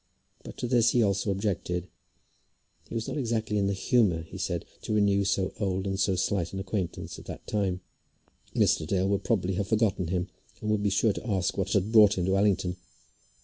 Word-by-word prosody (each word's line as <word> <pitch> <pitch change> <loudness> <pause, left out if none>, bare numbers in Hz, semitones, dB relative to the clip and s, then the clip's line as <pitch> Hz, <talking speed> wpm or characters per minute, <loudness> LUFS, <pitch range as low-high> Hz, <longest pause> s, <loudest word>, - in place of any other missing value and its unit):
But - - -10
to 125 - -3
this 120 -1 +4
he 120 - +4
also 100 0 0
objected. 95 -3 -2 1.0
He - - -6
was 115 -1 -2
not - - -3
exactly 110 -4 -1
in 100 - +1
the 100 - +1
humour, 95 -5 +2
he 80 - -10
said, - - -2 0.2
to - - -3
renew 100 -1 +3
so 95 -1 0
old 95 -2 -1
and 95 0 -2
so 95 -1 +2
slight 90 -1 -1
an 95 - -3
acquaintance 95 -2 -4
at - - -13
that - - -8
time. 95 -4 -1 0.7
Mr. 80 - +2
Dale 95 +1 +1
would 100 0 0
probably 95 -5 0
have 100 -1 -1
forgotten 105 -5 +1
him, 90 +1 -1 0.3
and 105 - -2
would 105 -1 +1
be 100 - +2
sure 100 +2 +2
to 120 - -6
ask 95 -3 0
what 95 +1 -1
had 100 +1 +1
brought 105 -3 +6
him 90 - 0
to 95 +1 +2
Allington. 95 -3 +1
100 Hz, 205 wpm, -28 LUFS, 95-105 Hz, 1.0 s, brought